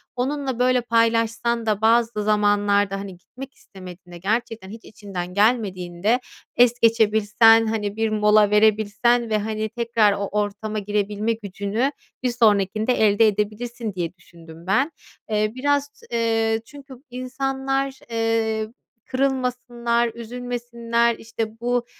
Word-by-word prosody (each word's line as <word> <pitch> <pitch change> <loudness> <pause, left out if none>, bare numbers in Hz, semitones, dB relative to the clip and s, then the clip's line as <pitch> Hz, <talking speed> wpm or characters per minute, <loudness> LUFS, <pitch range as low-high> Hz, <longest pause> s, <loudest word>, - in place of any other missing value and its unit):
onunla, 265 0 -2
böyle, 250 0 +3
paylaşsan 230 0 +1
da 215 -1 0
bazı 230 -1 +2
zamanlarda, 205 -1 +2
hani, 195 -2 -8
gitmek 260 +9 -11
istemediğinde, 180 -2 -13
gerçekten 215 +1 -3
hiç 220 +2 -11
içinden 190 -4 -7
gelmediğinde 205 -1 +1 0.4
es 245 0 +4
geçebilsen, 225 0 +4
hani, 210 -2 -2
bir 225 0 0
mola 210 -1 +4
verebilsen 220 +3 +2
ve, 215 - +2
hani, 215 +1 -3
tekrar 230 -3 +2
o 200 0 -3
ortama 210 +1 -2
girebilme 210 +2 -1
gücünü 210 +4 -2 0.3
bir 250 - +1
sonrakinde 215 0 +2
elde 215 0 +4
edebilirsin 215 +2 -3
diye 175 -2 -3
düşündüm 170 -1 -15
ben. 265 +11 +2 0.4
Eee, 215 0 0
biraz, 285 +2 0 0.2
eee, 225 -1 +1
çünkü 280 -1 -13
insanlar, 270 +1 -3
eee, 225 -1 0 0.4
kırılmasınlar, 250 -3 -1
üzülmesinler, 235 0 -2
işte, 225 0 -6
bu, 245 0 0
225 Hz, 115 wpm, -22 LUFS, 205-240 Hz, 0.4 s, es